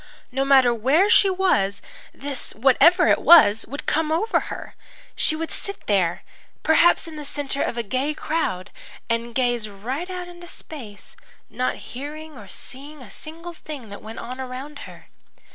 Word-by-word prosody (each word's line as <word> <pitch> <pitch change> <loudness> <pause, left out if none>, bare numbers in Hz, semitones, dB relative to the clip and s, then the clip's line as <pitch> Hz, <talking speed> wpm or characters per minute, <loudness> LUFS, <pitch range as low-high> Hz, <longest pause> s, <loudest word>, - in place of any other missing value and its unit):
No 270 +2 0
matter 265 -3 +5
where 285 - +3
she 395 - +7
was, 280 - +1 0.3
this, 275 -2 -5
whatever 325 - +5
it - - +3
was, 225 -11 +7
would 285 +4 -7
come 315 0 +1
over 405 +8 +2
her. - - -7 0.4
She 310 - +2
would 325 +1 -4
sit 400 -1 -7
there, 185 -5 +1 0.4
perhaps 335 +2 +4
in 315 -2 -9
the 300 - -6
centre 280 -1 -2
of 240 - -1
a 235 - 0
gay 260 +8 -1
crowd, 245 - -2 0.4
and 230 0 -1
gaze 240 -4 +1
right 255 - -5
out 360 -1 -5
into 350 0 -11
space, 230 -13 -10 0.4
not 255 0 -1
hearing 300 +4 -8
or 210 -6 -11
seeing 280 +7 -7
a 205 - -12
single 330 - -7
thing 290 -8 -9
that 200 - -9
went 220 +1 -9
on 255 +2 -6
around 260 +3 -7
her. - - -14
275 Hz, 165 wpm, -23 LUFS, 235-320 Hz, 0.4 s, she